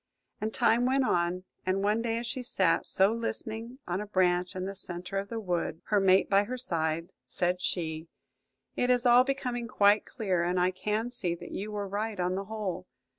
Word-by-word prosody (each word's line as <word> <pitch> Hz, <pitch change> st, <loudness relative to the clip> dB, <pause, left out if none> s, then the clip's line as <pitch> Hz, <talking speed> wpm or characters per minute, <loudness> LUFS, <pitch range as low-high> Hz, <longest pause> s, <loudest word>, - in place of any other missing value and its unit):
And 215 Hz, +1 st, -1 dB
time 240 Hz, +3 st, +3 dB
went 265 Hz, 0 st, +2 dB
on: 175 Hz, -1 st, +1 dB, 0.2 s
and 190 Hz, +1 st, 0 dB
one 210 Hz, +2 st, +2 dB
day 230 Hz, -1 st, -1 dB
as 235 Hz, -, -3 dB
she 255 Hz, +2 st, -3 dB
sat, 190 Hz, -8 st, +1 dB
so 195 Hz, +3 st, +4 dB
listening, 230 Hz, +1 st, -4 dB
on 180 Hz, +3 st, -1 dB
a 210 Hz, -, -6 dB
branch 180 Hz, -2 st, +1 dB
in 185 Hz, 0 st, -3 dB
the 195 Hz, -, -4 dB
centre 180 Hz, 0 st, -5 dB
of 200 Hz, 0 st, -6 dB
the 230 Hz, -, -3 dB
wood, 175 Hz, -5 st, -2 dB
her 210 Hz, -, +4 dB
mate 190 Hz, 0 st, +4 dB
by 200 Hz, +1 st, +4 dB
her 255 Hz, +4 st, -4 dB
side, 165 Hz, -7 st, -2 dB, 0.2 s
said 180 Hz, +1 st, -1 dB
she, 160 Hz, -3 st, -2 dB, 0.7 s
"It 245 Hz, -, +1 dB
is 250 Hz, 0 st, +3 dB
all 245 Hz, +1 st, +7 dB
becoming 250 Hz, -3 st, -2 dB
quite 205 Hz, -1 st, +4 dB
clear, 190 Hz, -7 st, -1 dB
and 180 Hz, +1 st, +1 dB
I 180 Hz, +1 st, +3 dB
can 210 Hz, +5 st, -2 dB
see 180 Hz, -8 st, -1 dB
that -, -, -10 dB
you 210 Hz, +2 st, -4 dB
were 205 Hz, -1 st, -3 dB
right 205 Hz, +1 st, -3 dB
on 180 Hz, +1 st, +1 dB
the 195 Hz, +1 st, -3 dB
whole. 200 Hz, -4 st, -4 dB
200 Hz, 205 wpm, -29 LUFS, 180-230 Hz, 0.7 s, all